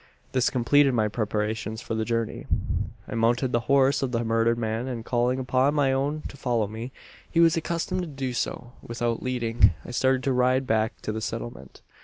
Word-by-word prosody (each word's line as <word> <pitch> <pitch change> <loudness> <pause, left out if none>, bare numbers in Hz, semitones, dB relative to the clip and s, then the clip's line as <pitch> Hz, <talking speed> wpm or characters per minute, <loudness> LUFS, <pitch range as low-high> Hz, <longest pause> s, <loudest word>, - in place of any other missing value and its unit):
"This 130 -2 +2
completed 135 +1 +3
my 110 -2 +2
preparations 110 0 -2
for 115 - -5
the 110 0 -1
journey. 115 -1 -2 0.6
"I - - -6
mounted 120 +3 +2
the 120 - +2
horse 140 0 +4
of 135 -2 -1
the 120 -1 0
murdered 115 +1 +2
man; 115 +2 -2
and, 120 -3 -5
calling 125 +1 +1
upon 130 +2 +1
my 140 -3 +3
own 145 +3 -1
to - - -11
follow 120 -5 0
me 110 +5 -6 0.4
he 165 - 0
was 165 0 +6
accustomed 170 +3 -2
to 175 - -4
do 135 -4 -4
so 120 0 -3
without 115 0 -2
leading 115 -6 +2
I - - -7
started 130 +1 +2
to 135 - +1
ride 130 +1 +2
back 110 0 0
to - - -2
the 110 +1 -4
settlement. - - -6
125 Hz, 195 wpm, -26 LUFS, 115-135 Hz, 0.6 s, was